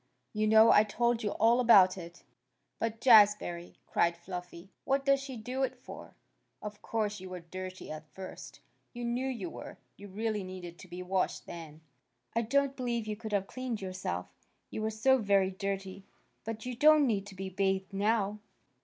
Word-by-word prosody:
You 215 0 +1
know. 220 +1 +7
I 210 - +7
told 235 +2 0
you 210 - -1
all 235 +2 +4
about 195 -6 +7
it." 170 -2 -10 0.6
"But, 225 0 -2
Jazbury!" 205 -7 +5
cried 170 0 +1
Fluffy. 180 +1 -8
"What 275 0 0
does 275 0 +4
she 270 -2 -7
do 250 +4 -4
it 260 -1 0
for? 250 - -11 0.4
Of 210 0 -8
course 210 -2 -2
you 185 0 -9
were 180 -1 -7
dirty 185 +1 -8
at 155 0 -8
first. 190 -1 -10 0.3
You 240 -1 -5
know 245 +3 -1
you 225 -10 -4
were. - - -9 0.2
You 205 - -10
really 210 +1 -2
needed 180 -2 -8
to - - -12
be 180 +1 -7
washed 185 +1 -1
then. 160 -2 -9 0.5
I 230 - +3
don't 275 +4 +1
believe 240 -4 -2
you 215 -1 -3
could 220 0 -7
have 200 -2 +1
cleaned 255 -1 -4
yourself, 185 - -4 0.4
you - - -4
were 220 - 0
so 255 +5 +3
very 200 -3 +2
dirty. 195 0 -4 0.4
But 225 0 -5
you 250 -1 -4
don't 305 +3 +6
need 205 -5 0
to 200 - -11
be 190 0 -5
bathed 190 +1 -1
now." 205 0 +1
210 Hz, 180 wpm, -31 LUFS, 185-235 Hz, 0.6 s, know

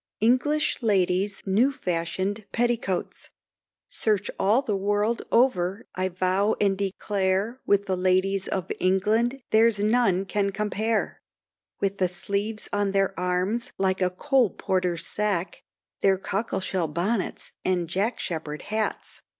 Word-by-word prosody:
ENGLISH 255 +8 +2
LADIES' 195 -2 +1
NEW 215 +8 +3
FASHIONED 190 0 -2
PETTICOATS. 235 -6 -1 0.6
Search 210 -2 0
all 220 +7 +3
the 215 -6 -1
world 205 +4 0
over 205 -5 +2
I 185 0 -1
vow 185 +3 +1
and 200 -1 +2
declare, 200 +3 -1
With 200 0 +3
the 190 -1 0
ladies 185 +1 +1
of 190 -3 -3
England 220 +8 +1
there's 225 0 +4
none 210 -3 +2
can 200 0 0
compare 210 +2 -1 0.6
With 195 0 -1
the 185 - +3
sleeves 200 +4 -3
on 205 -1 0
their 195 -1 +2
arms 180 +6 -1
like 190 0 0
a 180 - +3
coal 250 +5 +2
porter's 180 -3 -1
sack, 200 -4 -1 0.4
Their 195 -1 +3
cockleshell 190 -3 -2
bonnets 185 +7 -2
and 180 -2 0
Jack 200 +8 -1
Sheppard 155 -3 -4
hats. 215 +1 -3
195 Hz, 125 wpm, -26 LUFS, 185-220 Hz, 0.6 s, there's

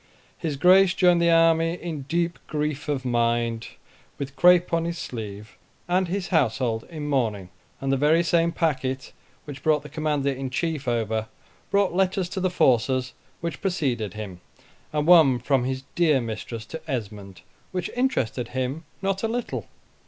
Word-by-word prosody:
His 160 -5 -3
Grace 185 +5 +5
joined 180 -2 +4
the 170 - +4
army 165 0 +4
in 160 -6 -6
deep 170 +1 0
grief 150 -1 -3
of 135 -3 -1
mind, 115 -1 0 0.5
with 140 -1 -6
crape 180 +1 +5
on 165 0 +2
his 170 0 -3
sleeve, 105 -5 -7 0.3
and 180 +1 +2
his 190 +1 -3
household 120 - +1
in 155 -3 -6
mourning; 110 -10 -1 0.3
and 135 0 -1
the 135 - +2
very 155 +5 +4
same 170 0 +2
packet 130 -6 -2 0.3
which 145 -2 -8
brought 155 -2 +2
the 150 - -10
Commander 150 -3 0
in 135 0 -4
Chief 155 +1 -2
over, 110 -2 -1 0.4
brought 200 -2 +2
letters 185 -1 +1
to 190 - -4
the 185 0 +1
forces 130 -4 +2 0.3
which 170 0 -4
preceded 135 - -1
him, 95 -5 -7 0.5
and 150 -1 0
one 160 -7 +7
from 125 +1 +1
his 130 0 -3
dear 160 -5 +3
mistress 115 -1 -5
to 160 +7 -8
Esmond, 105 -7 -5 0.3
which 180 -2 -3
interested 135 - 0
him 130 +6 -3 0.2
not 195 0 0
a 225 - 0
little. 235 +1 -3
150 Hz, 160 wpm, -25 LUFS, 125-170 Hz, 0.5 s, one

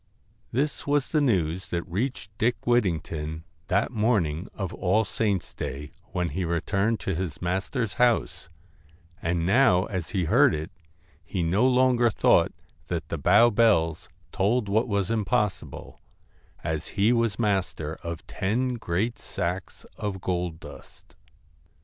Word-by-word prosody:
This 145 +5 -1
was 145 -2 +1
the 155 - +2
news 95 - +1
that 85 +1 -3
reached 105 +1 -3
Dick 120 +2 0
Whittington 80 -9 0 0.2
that - - +1
morning 105 -7 +1
of 95 -4 -4
All 105 +5 +1
Saints' 100 -2 -1
Day 75 +2 -5
when 90 -4 -2
he 95 - -3
returned 100 +6 0
to 95 - -2
his 85 -2 -4
master's 95 +6 -2
house, 120 -7 +1 0.7
and 85 0 0
now 95 -3 +4
as 90 -4 -4
he 95 -4 0
heard 80 - +4
it 80 +1 -5 0.5
he 90 -1 -2
no 95 +10 +3
longer 125 -2 +4
thought 110 - +3 0.4
that 80 -3 -3
the 80 - -3
Bow 105 +10 +5
bells 85 -8 +2 0.2
told 105 +3 +1
what 110 +5 +1
was 100 -2 0
impossible, 105 - -2 0.6
as 80 0 -2
he 105 +4 +4
was 115 -4 +1
master 95 -8 -1
of 85 -2 -6
ten 125 +7 -1
great 110 +3 -2
sacks 90 +2 -4
of 100 -3 -3
gold 90 -3 -2
dust. - - -13
95 Hz, 135 wpm, -26 LUFS, 85-115 Hz, 0.7 s, Bow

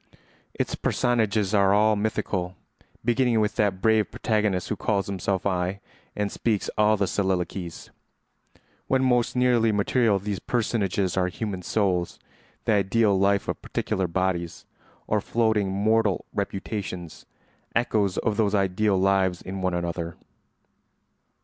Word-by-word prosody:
Its - - -2
personages 110 -5 0
are 100 -1 +4
all 110 +1 +4
mythical, 100 -3 -2 0.5
beginning 120 -1 +2
with 105 0 0
that 100 -2 0
brave 110 -1 +3
protagonist 105 -5 0
who - - -1
calls 100 -3 0
himself 95 0 -2
I 90 0 -1 0.4
and 105 -1 -1
speaks 110 -4 -1
all 105 0 +3
the 100 - +1
soliloquies. 95 -2 -2 1.0
When 130 0 +2
most 125 -2 +2
nearly 120 -3 +3
material 105 +1 +2
these 100 0 -4
personages 100 -6 -1
are 90 -1 +2
human 95 0 -4
souls—the 90 +1 -3
ideal 105 +1 +3
life 100 +1 +2
of - - -3
particular 95 -1 -2
bodies—or 90 +3 -3
floating 110 -3 +1
mortal 105 +1 +1
reputations—echoes 100 +1 -3
of 105 -2 0
those 105 -2 +2
ideal 100 +1 +1
lives 95 -1 +2
in 95 0 -5
one 95 -1 0
another. 85 -1 -3
100 Hz, 120 wpm, -25 LUFS, 95-110 Hz, 1.0 s, are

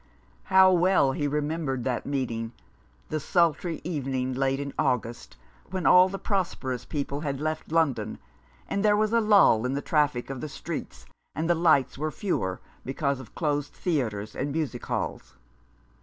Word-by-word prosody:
How 190 0 +6
well 175 -6 +4
he 145 +2 -1
remembered 150 -3 -2
that 125 -1 -2
meeting; 120 -5 -2 0.6
the 155 - -1
sultry 170 +1 +1
evening, 135 -6 -2
late 135 +1 0
in 140 -1 -4
August, 120 - -1 0.3
when 185 -1 -3
all 180 +1 +7
the 195 - -4
prosperous 130 - -2
people 140 -1 -3
had 140 -3 -3
left 155 +1 -3
London, 160 -5 +1 0.5
and 200 - -1
there 210 -1 +4
was 215 +1 +1
a 230 - +4
lull 200 - +5
in 130 +2 -1
the - - 0
traffic 145 -5 +1
of 135 - -6
the 155 - -5
streets, 135 - -6 0.3
and 160 +2 -1
the 175 - +4
lights 160 -6 +3
were 155 +1 -1
fewer 125 - -2 0.2
because 140 0 -1
of 130 - -12
closed 145 -2 -1
theatres 110 - -2
and 145 - -2
music 145 -5 -3
halls. - - -4
145 Hz, 160 wpm, -27 LUFS, 130-170 Hz, 0.6 s, all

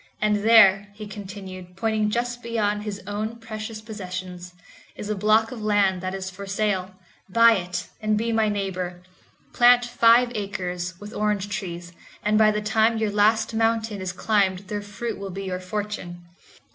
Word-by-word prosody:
And 210 0 +2
there," 205 -2 +6
he 215 0 -8
continued, 190 -3 -9
pointing 220 0 +1
just 240 +2 -2
beyond 215 -3 -1
his 205 -2 -6
own 210 +3 -3
precious 220 -1 -7
possessions, 185 -4 -7 0.4
"is 210 - -5
a - - 0
block 215 +3 +3
of 240 -3 -7
land 205 -3 +2
that 185 0 -3
is 190 -1 -5
for 190 +1 -8
sale; 195 -2 -1 0.3
buy 230 +4 +6
it 180 -4 -2
and 215 0 +1
be 230 +2 -1
my 220 -1 +2
neighbor; 185 -3 -3 0.5
plant 245 0 +6
five 240 0 +4
acres 180 -4 -4
with 210 +1 -9
orange 210 -2 -1
trees, 175 -5 -5 0.3
and 210 +1 +2
by 215 -1 +6
the 210 0 -1
time 220 +1 +2
your 220 -2 0
last 215 +2 +2
mountain 225 -2 0
is 185 -1 -3
climbed 190 -1 0
their 205 -1 -3
fruit 205 +2 -5
will 195 0 -5
be 195 +1 -6
your 185 -1 -3
fortune." 185 -2 -5
210 Hz, 170 wpm, -24 LUFS, 190-220 Hz, 0.5 s, there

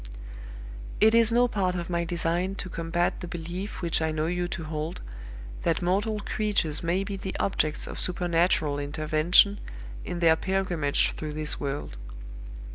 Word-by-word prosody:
"It 220 +1 +5
is 230 -1 +5
no 245 +1 +4
part 190 -5 -1
of 170 -1 -3
my 170 -1 -1
design 175 +2 0
to 185 - -6
combat 170 +1 -1
the 180 - -6
belief 175 +4 -6
which 170 -1 +2
I 160 - +1
know 155 0 -1
you 175 +1 -1
to 175 -1 -5
hold, 155 +2 -4 0.6
that 170 +2 0
mortal 205 +4 0
creatures 200 -8 0
may 175 +3 0
be 195 0 -5
the 190 0 -5
objects 155 -6 0
of - - -7
supernatural 170 -4 +1
intervention 155 +7 +3 0.4
in 175 - -4
their 165 -2 +5
pilgrimage 180 -5 0
through 155 -1 -6
this 155 0 0
world. 140 - -4
175 Hz, 155 wpm, -27 LUFS, 160-190 Hz, 0.6 s, It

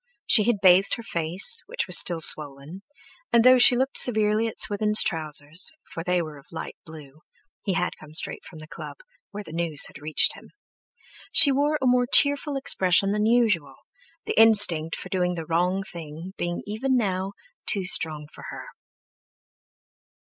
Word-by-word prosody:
She 215 -4 +4
had 230 -4 -1
bathed 185 +1 +3
her 235 - -11
face, 180 - +1
which - - -4
was - - 0
still 170 -3 +1
swollen, 150 +4 +2 0.5
and 235 -1 +3
though 255 +1 +5
she 245 - +5
looked 265 +2 +1
severely 215 -1 0
at 225 - -9
Swithin's 210 +1 +4
trousers, 155 - -1 0.2
for 165 - -7
they 180 0 -1
were 155 -3 -11
of 135 - -23
light 165 - -8
blue—he 155 +4 -11
had 180 0 -3
come 155 0 -11
straight - - -2
from 165 - -14
the 155 0 -13
club, - - -11 0.3
where 210 0 -9
the 160 - -13
news 165 -3 0
had - - -11
reached 155 +1 +1
him—she 330 -10 -2
wore 290 +3 -1
a 265 - -4
more 250 0 +1
cheerful 285 0 +3
expression 195 -6 +1
than 210 +1 -1
usual, 225 -10 0 0.5
the - - -4
instinct 195 -8 +3
for 185 - -11
doing 180 -1 -2
the 165 -2 -7
wrong 180 +4 -2
thing 165 +1 -11
being 175 0 -5
even 250 +6 -2
now 190 -3 -3 0.3
too 195 -4 -2
strong 155 -4 -2
for - - -13
her. - - -10
185 Hz, 165 wpm, -23 LUFS, 160-225 Hz, 0.5 s, though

